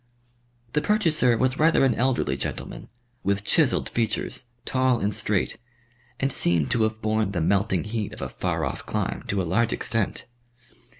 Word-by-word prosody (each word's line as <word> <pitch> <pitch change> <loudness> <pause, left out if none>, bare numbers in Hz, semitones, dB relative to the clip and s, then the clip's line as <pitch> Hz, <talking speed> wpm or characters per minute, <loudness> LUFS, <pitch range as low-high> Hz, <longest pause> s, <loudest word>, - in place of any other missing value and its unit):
The 150 - +2
purchaser 155 - +3
was 130 +2 +1
rather 160 -3 +5
an 130 - +3
elderly 120 - +1
gentleman, 65 - -5 0.3
with 100 +1 0
chiselled - - +2
features, 115 +2 -2 0.2
tall 130 -2 +2
and 105 +1 0
straight, 105 -1 0 0.6
and 135 -1 0
seemed 85 -4 +2
to 120 - +2
have 110 0 0
borne 110 -2 +1
the 90 - 0
melting 95 0 +2
heat 105 -1 -3
of - - -10
a - - -2
far - - -2
off - - -4
clime - - -2
to 100 - 0
a - - +1
large 115 +7 +1
extent. 115 -4 -1
110 Hz, 165 wpm, -25 LUFS, 100-130 Hz, 0.6 s, rather